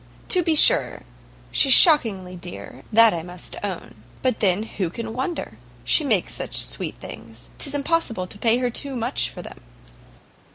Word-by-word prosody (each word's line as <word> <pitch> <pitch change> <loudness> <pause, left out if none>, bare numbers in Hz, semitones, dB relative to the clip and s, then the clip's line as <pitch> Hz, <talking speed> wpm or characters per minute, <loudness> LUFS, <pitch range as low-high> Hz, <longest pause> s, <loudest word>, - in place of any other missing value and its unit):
To 365 - +3
be 325 -2 0
sure - - +4 0.5
she's 270 - +4
shockingly 220 - +4
dear, 175 0 -10
that 230 0 +5
I 170 - -4
must 175 +1 -10
own; 190 -4 -6 0.3
but 255 -3 0
then 195 0 +1
who 195 -5 -4
can 225 +5 -7
wonder? 265 +8 -5 0.2
She 315 - +2
makes 220 -10 0
such - - -1
sweet - - -2
things, 115 +1 -12
'tis 285 0 -1
impossible 280 - -1
to 205 - -7
pay 230 +1 +2
her 250 -1 -2
too 275 +3 -2
much 240 +2 -1
for - - -10
them." - - -12
225 Hz, 165 wpm, -22 LUFS, 180-270 Hz, 0.5 s, that